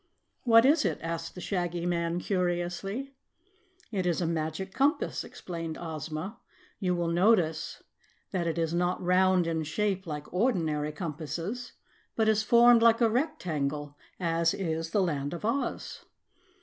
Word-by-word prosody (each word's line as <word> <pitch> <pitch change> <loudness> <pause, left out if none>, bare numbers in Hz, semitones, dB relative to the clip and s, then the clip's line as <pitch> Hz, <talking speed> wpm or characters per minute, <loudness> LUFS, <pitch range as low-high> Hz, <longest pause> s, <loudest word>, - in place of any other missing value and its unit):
"What 230 0 +7
is 295 +3 +5
it?" - - 0
asked 165 0 -4
the 180 - -7
Shaggy 175 -2 -2
Man 170 -1 0
curiously. 180 +7 -2 0.8
"It 190 -4 -1
is 175 - +1
a 175 - 0
Magic 165 +3 -2
Compass," 285 +4 +1
explained 165 -3 -6
Ozma. 160 +4 -5 0.4
"You 180 -3 +1
will 170 -1 -1
notice 175 -3 +2 0.5
that 175 -3 -1
it 165 - -1
is 165 -1 0
not 175 +1 +1
round 185 0 +3
in 165 -1 -1
shape 190 +4 -1
like 150 0 -6
ordinary 165 - +1
compasses, 165 - -5 0.4
but 220 -1 +2
is 215 -1 +4
formed 235 +1 +6
like 230 0 +5
a 230 -2 +3
rectangle, 150 - -2 0.2
as 165 -1 +1
is 165 -3 -2
the 200 +2 +2
Land 145 -3 -2
of 175 - -6
Oz." 270 +5 -2
175 Hz, 145 wpm, -29 LUFS, 165-210 Hz, 0.8 s, What